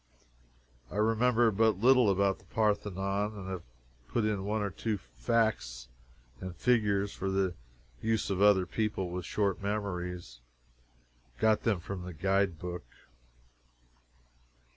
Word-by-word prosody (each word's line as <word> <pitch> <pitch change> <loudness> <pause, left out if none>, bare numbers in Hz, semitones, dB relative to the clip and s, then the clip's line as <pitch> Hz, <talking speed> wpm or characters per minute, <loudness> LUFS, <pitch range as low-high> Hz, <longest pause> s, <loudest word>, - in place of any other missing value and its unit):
I - - -9
remember 115 +2 +3
but 110 0 +3
little 125 +1 +5
about 100 0 +2
the - - -22
Parthenon, 105 -1 0
and 95 -2 -7
I - - -4
have 90 -2 -5 0.4
put 115 -3 0
in 105 -3 0
one 105 +1 0
or 100 - -2
two 110 +3 -2
facts 60 - -1 0.5
and 90 -2 -6
figures 100 -3 +2
for 95 - -3
the 95 -1 +1 0.5
use 110 -2 0
of 95 0 -1
other 100 -3 +6
people 100 -3 -2
with 90 0 -4
short 100 -3 0
memories. 90 - -3 1.0
Got 110 -1 +3
them 105 -7 +1
from 95 +1 -5
the 90 0 -7
guide 95 +1 +1
book. 90 +2 -6
100 Hz, 135 wpm, -31 LUFS, 90-110 Hz, 1.0 s, other